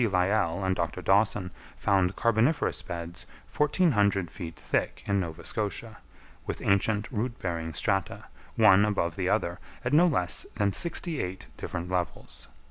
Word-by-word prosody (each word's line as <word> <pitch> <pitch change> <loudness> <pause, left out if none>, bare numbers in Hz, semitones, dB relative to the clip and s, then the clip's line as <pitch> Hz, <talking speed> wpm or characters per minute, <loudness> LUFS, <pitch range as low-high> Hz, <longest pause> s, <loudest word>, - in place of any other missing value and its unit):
Lyell 90 -1 +1
and 95 0 +1
Dr. 85 +1 -3
Dawson 100 -2 +2 0.3
found 95 -1 +2
carboniferous 115 +7 +2
beds 85 0 -6 0.3
1,400 105 - +2
feet 85 -4 -8
thick - - -2
in 100 0 +1
Nova 80 -4 -5
Scotia, 110 +1 -3 0.5
with - - -3
ancient 105 +2 +1
root 115 +1 -2
bearing 80 -3 -3
strata, - - 0 0.3
one 95 +2 +6
above 90 -6 0
the 95 -1 -1
other, 90 -5 0 0.3
at 120 - 0
no 170 +4 +6
less 90 - 0
than 100 -1 +1
sixty 170 - +1
eight 90 +1 -5
different 85 +1 -5
levels. 90 -7 -3
100 Hz, 140 wpm, -28 LUFS, 90-110 Hz, 0.5 s, one